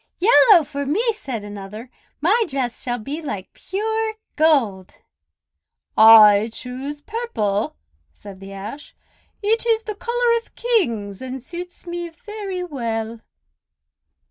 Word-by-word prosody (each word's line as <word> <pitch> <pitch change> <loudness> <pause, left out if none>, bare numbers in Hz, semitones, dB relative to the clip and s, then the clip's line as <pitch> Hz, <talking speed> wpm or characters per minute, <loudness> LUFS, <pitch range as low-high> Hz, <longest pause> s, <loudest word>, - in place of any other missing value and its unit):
"Yellow 410 -2 +6
for 280 0 -5
me!" 450 - +1
said 260 - -6
another. 205 +4 -9 0.3
"My 415 +9 +3
dress 260 -4 -3
shall 245 -1 -2
be 280 +8 -5
like 205 - -6
pure 440 +3 -2 0.2
gold." 245 - +2 1.0
"I 220 -1 +8
choose 265 +5 -6
purple!" 290 - -2 0.4
said 190 - -12
the 195 0 -10
Ash. 210 +9 -8 0.5
"It 445 +3 +2
is 450 -1 +2
the 430 - -4
color 475 +2 +1
of - - -29
Kings, 235 - 0
and 260 0 -5
suits 355 +5 -9
me 345 0 -5
very 390 +1 -6
well." 230 -7 -4
285 Hz, 120 wpm, -21 LUFS, -, 1.0 s, I